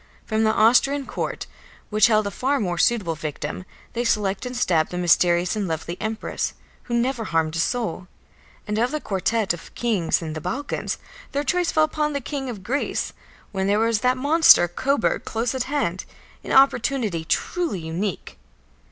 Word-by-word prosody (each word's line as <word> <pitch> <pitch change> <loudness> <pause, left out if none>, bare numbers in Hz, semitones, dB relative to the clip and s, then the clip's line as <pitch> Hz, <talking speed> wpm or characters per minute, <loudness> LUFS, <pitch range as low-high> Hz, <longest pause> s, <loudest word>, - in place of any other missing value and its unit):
From 220 0 0
the 220 - +4
Austrian 250 +6 +4
court, - - -4 0.5
which 215 +1 +5
held 215 -2 +3
a 200 - -2
far 275 +5 0
more 175 -4 -2
suitable 205 -7 +2
victim, 155 +4 -5 0.3
they 240 - -1
select 210 -1 0
and 250 0 -5
stab 165 -9 +2
the 180 - -5
mysterious 175 +1 +3
and 205 -3 -2
lovely 165 +1 -3
Empress, 220 +1 -3 0.3
who 240 - -2
never 235 -1 0
harmed 160 -3 0
a - - -1
soul. 185 -3 -1 0.6
And 210 +1 -1
of 240 +2 +2
the 305 - -2
quartet 205 -2 0
of 175 - -10
kings 210 -9 +1
in 160 -2 -5
the 155 - -5
Balkans, 265 - -3 0.4
their 285 +1 0
choice 355 +4 +1
fell 310 - +3
upon 305 -1 0
the 280 - -1
King 270 0 -4
of 210 -6 -7
Greece, 275 +8 -2 0.4
when 190 -1 -1
there 205 +1 +3
was 225 0 +2
that 250 +3 +2
monster 290 - +6
Coburg 265 +9 0
close 230 +2 -2
at 260 -1 -2
hand, 225 -11 -1 0.4
an - - -6
opportunity 245 -9 +3
truly 320 - -1
unique. 170 +4 -4
220 Hz, 175 wpm, -23 LUFS, 180-260 Hz, 0.6 s, monster